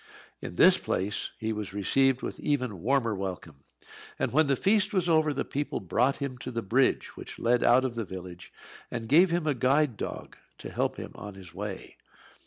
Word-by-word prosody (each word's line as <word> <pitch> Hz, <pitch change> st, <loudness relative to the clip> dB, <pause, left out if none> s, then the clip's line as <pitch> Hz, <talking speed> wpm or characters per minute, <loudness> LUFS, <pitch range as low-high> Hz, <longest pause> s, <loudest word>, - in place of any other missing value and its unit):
In -, -, -7 dB
this -, -, +6 dB
place 100 Hz, +3 st, -2 dB
he 110 Hz, 0 st, -2 dB
was 105 Hz, -2 st, -5 dB
received 135 Hz, +6 st, +2 dB
with -, -, -5 dB
even 125 Hz, -, -1 dB
warmer 120 Hz, -1 st, +1 dB
welcome; 95 Hz, -6 st, -5 dB, 0.6 s
and -, -, -1 dB
when 155 Hz, +1 st, +4 dB
the 140 Hz, -, +3 dB
feast 205 Hz, +5 st, +2 dB
was 180 Hz, -2 st, +2 dB
over, 155 Hz, -2 st, +3 dB
the 140 Hz, -1 st, -2 dB
people 145 Hz, +1 st, -3 dB
brought 125 Hz, +9 st, +1 dB
him 130 Hz, -3 st, -5 dB
to 125 Hz, -, -6 dB
the 115 Hz, -2 st, -3 dB
bridge 125 Hz, +7 st, +1 dB
which -, -, -8 dB
led 120 Hz, +1 st, +2 dB
out 130 Hz, +2 st, +5 dB
of 130 Hz, -, -2 dB
the 115 Hz, -1 st, -3 dB
village, 90 Hz, -2 st, -9 dB, 0.4 s
and 115 Hz, -2 st, -5 dB
gave 170 Hz, +9 st, +6 dB
him 170 Hz, -1 st, 0 dB
a 150 Hz, -, +2 dB
guide 130 Hz, 0 st, +2 dB
dog -, -, -6 dB, 0.2 s
to -, -, -8 dB
help -, -, -1 dB
him -, -, -7 dB
on 100 Hz, 0 st, -9 dB
his 95 Hz, -3 st, -12 dB
way. -, -, -7 dB
125 Hz, 195 wpm, -28 LUFS, 105-145 Hz, 0.6 s, this